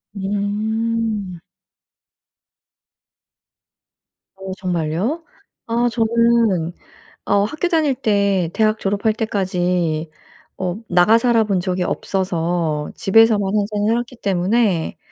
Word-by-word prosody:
음. 205 0 -2 3.0
어 190 0 -8
정말요? 180 - -2 0.4
아 235 +1 +1
저는 230 -6 +2 0.5
어 200 - +2
학교 305 +9 -2
다닐 315 -6 +1
때 200 -6 +1
대학 215 -1 +2
졸업할 205 +3 0
때까지 180 -7 -1 0.5
어 185 0 -3
나가 180 +5 +5
살아본 225 -5 +2
적이 180 0 -1
없어서 170 -5 -2
집에서만 215 0 +4
항상 210 0 0
살았기 240 +3 -1
때문에 195 -2 0
205 Hz, 180 characters per minute, -20 LUFS, 180-225 Hz, 3.0 s, 나가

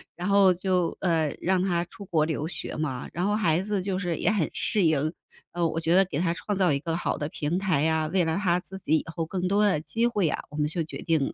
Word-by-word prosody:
然 175 +2 -4
后 200 -2 +5
就 180 -1 0
呃， 160 -5 +1
让 185 0 +2
他 175 -3 +1
出 200 +3 -12
国 160 -4 +1
留 155 -1 -2
学 175 - -5
嘛， 140 -5 -3
然 175 +2 -1
后 205 +1 +1
孩 190 -7 +2
子 205 0 -1
就 190 0 -2
是 175 -4 -2
也 - - +1
很 205 -7 +1
适 210 -3 +1
应。 155 -2 +2 0.4
呃， 175 0 0
我 160 - -2
觉 165 +1 +2
得 190 - +7
给 155 -5 -3
他 170 -1 +1
创 195 +4 -3
造 185 -4 +3
一 140 - 0
个 165 +2 -3
好 170 - -1
的 145 - -3
平 155 +2 -2
台 185 -7 +1
呀， 160 0 +1
为 185 -1 +3
了 160 0 0
他 180 -3 +2
自 190 +1 -9
己 160 -4 +2
以 - - -3
后 165 0 -3
更 180 +2 -2
多 205 +2 +3
的 190 -7 +2
机 230 +8 0
会 210 -7 +1
啊， - - -2
我 150 - -9
们 150 0 +1
就 165 +2 0
决 155 - -8
定 160 -5 0
175 Hz, 285 characters per minute, -26 LUFS, 160-190 Hz, 0.4 s, 得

